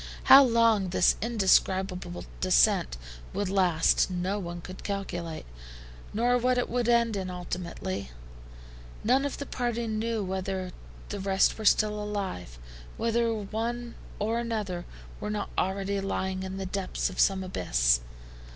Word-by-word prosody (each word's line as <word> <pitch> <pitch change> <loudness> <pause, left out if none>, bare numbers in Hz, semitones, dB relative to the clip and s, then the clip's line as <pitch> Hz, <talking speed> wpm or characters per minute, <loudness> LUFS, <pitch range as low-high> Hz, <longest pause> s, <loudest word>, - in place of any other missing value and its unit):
How 275 +1 +10
long 230 -6 +3
this 180 0 +3
indescribable 190 -4 +1
descent - - +3 0.4
would 200 -2 -1
last, 180 -4 +3
no 185 +3 -2
one 175 -2 -5
could 185 +2 -10
calculate, 175 -5 -4 0.7
nor 245 +3 +2
what 250 +1 +2
it 245 - +1
would 240 -1 0
end 235 -2 +3
in 190 -2 -3
ultimately. 175 - -5 0.9
None 260 +5 +3
of 285 - -3
the 280 - -5
party 240 -3 -2
knew 220 0 -1
whether 190 -1 -3 0.4
the 205 - -4
rest 195 0 +2
were 215 - -5
still 210 0 +3
alive, 195 - -4 0.4
whether 230 0 +1
one 225 +3 -3 0.2
or 225 +3 0
another 210 -7 -3 0.3
were 210 - -4
not 210 -1 -3
already 195 +1 -1
lying 190 -1 -2
in 190 0 -5
the 195 - -4
depths 190 0 -2
of - - -9
some 190 -1 +3
abyss. 60 - +2
195 Hz, 140 wpm, -28 LUFS, 185-230 Hz, 0.9 s, How